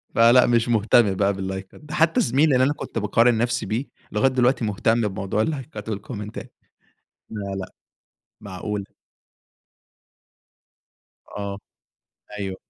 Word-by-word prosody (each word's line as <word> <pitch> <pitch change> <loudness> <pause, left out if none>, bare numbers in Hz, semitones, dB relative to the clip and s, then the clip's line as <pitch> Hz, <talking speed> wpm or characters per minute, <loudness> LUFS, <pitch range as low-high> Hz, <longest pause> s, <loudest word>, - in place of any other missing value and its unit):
فلأ 120 +2 +6
مش 120 -1 +2
مهتم 110 -2 +4
بقى 100 +1 +2
باللايكات، 95 +4 -6
ده 150 +1 -6
حتى 165 +1 +3
زمايلي 140 +4 +3
اللي 130 0 +4
أنا 145 - +1
كنت 115 - -7
باقارن 115 +3 +3
نفسي 120 +1 0
بيه، 120 +6 -2 0.3
لغاية 105 +6 +3
دلوقتي 125 -2 +2
مهتم 110 +3 +1
بموضوع 95 +2 -2
اللايكات 115 -6 -4
والكومنتات 105 0 -6 0.8
لأ، 100 -3 -5
لأ، 95 - -5 0.7
معقولة. 100 0 -5 2.4
آه، 100 -1 -5 0.8
أيوه. 95 -2 -4
110 Hz, 120 wpm, -23 LUFS, 100-125 Hz, 2.4 s, فلأ